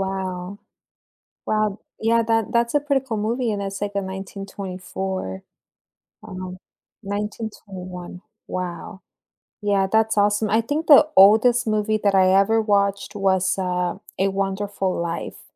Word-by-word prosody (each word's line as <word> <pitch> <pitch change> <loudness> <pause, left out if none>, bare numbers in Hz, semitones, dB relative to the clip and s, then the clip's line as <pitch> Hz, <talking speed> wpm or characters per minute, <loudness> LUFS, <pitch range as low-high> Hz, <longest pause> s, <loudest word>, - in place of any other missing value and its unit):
Wow. 190 0 -4 0.9
Wow, 215 0 +2 0.3
th 225 - -1
yeah, 230 0 +4
that 225 -1 0
that's 235 0 +2
a - - +5
pretty 280 -2 0
cool 225 -4 -2
movie, 230 +3 -1
and 205 -1 -2
it's, 195 0 -5
like, 205 0 -2
in 200 -1 -1
1924, 190 - -5 0.8
um 185 0 -7 0.4
1921. 195 -3 -6 0.3
Wow. 185 +2 -5 0.6
Yeah, 200 -2 +2
that's 220 -1 +2
awesome. 205 +1 +2
I 220 +2 +3
think 295 +7 -3
the 300 0 +8
oldest 225 +5 +6
movie 215 0 +1
that 200 -1 +3
I 185 -1 +5
ever 220 +3 +4
watched 200 -2 0
was, 190 -2 +1
uh, 180 -2 -1 0.2
A 195 - +3
Wonderful 195 0 -2
Life, 170 0 -4
200 Hz, 135 wpm, -22 LUFS, 190-220 Hz, 0.9 s, the